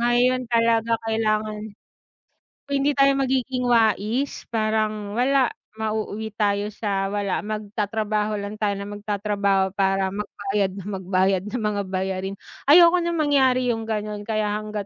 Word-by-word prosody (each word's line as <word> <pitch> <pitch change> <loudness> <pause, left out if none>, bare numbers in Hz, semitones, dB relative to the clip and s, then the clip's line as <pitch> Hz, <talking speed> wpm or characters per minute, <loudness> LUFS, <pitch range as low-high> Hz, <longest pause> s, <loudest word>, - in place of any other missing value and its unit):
Ngayon 245 +2 +3
talaga 230 -1 +2
kailangan. 215 -1 0 1.1
Kung 280 - -1
hindi 285 +2 +2
tayo 275 0 +5
magiging 260 -1 0
wais 230 +3 +1
parang 215 -2 -1
wala, 260 +1 +3 0.2
mauuwi 220 0 -3
tayo 205 -1 +1
sa 200 -2 -2
walam 200 -1 -1
magtatrabaho 210 0 -2
lang 200 +1 -5
tayo 200 -1 +1
na 200 - -5
magtatrabaho 205 -2 -1
para 195 -1 +1
magbayad 200 -1 -2
nang 200 +1 -6
magbayad 190 0 +1
ng 245 - -3
mga 205 -1 0
bayarin 190 +1 -2 0.3
ayoko 340 +3 +8
ng 340 0 -1
mangyari 270 -4 +3
'yung 225 - -4
gano'n 210 -1 -3
kaya 215 -1 -1
hanggat 210 -1 -5
215 Hz, 135 wpm, -23 LUFS, 200-230 Hz, 1.1 s, ayoko